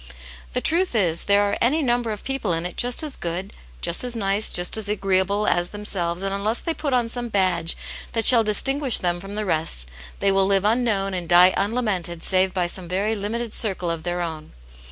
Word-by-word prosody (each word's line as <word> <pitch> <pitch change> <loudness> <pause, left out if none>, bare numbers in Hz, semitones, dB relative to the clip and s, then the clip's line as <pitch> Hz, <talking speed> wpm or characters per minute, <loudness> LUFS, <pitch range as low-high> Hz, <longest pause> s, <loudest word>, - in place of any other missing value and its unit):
The - - -1
truth 345 -3 0
is, 170 -6 +1
there 200 0 +3
are 200 - 0
any 295 +6 +2
number 240 -2 0
of 210 -1 -5
people 270 -9 -2
in 165 +1 -2
it 180 - -6
just 245 +4 +1
as 300 -3 -3
good 175 +3 -5 0.3
just 170 - +2
as 245 -1 +2
nice, 200 -1 +1
just 175 0 0
as 215 -2 +1
agreeable 195 0 0
as 175 0 +1
themselves 185 -4 -1
and 195 0 -1
unless 210 +4 -1
they 330 - -3
put 300 -3 -4
on 245 -2 +1
some 240 0 -2
badge 180 -5 0 0.4
that 225 -1 0
shall 235 -3 +7
distinguish 265 +5 +3
them 175 -1 -1
from 195 +3 -7
the 215 0 -3
rest, 155 - +1 0.3
they 200 - +2
will 195 0 +2
live 195 0 +1
unknown 210 -4 +1
and 175 -2 -4
die 180 +1 +6
unlamented 195 -6 -2
save 190 0 +2
by 180 -2 -1
some 175 +1 -4
very 195 +5 -1
limited 225 +2 -4
circle 185 -5 +1
of 165 -1 -4
their 175 +1 -3
own. 160 -2 -6
200 Hz, 210 wpm, -22 LUFS, 180-230 Hz, 0.4 s, shall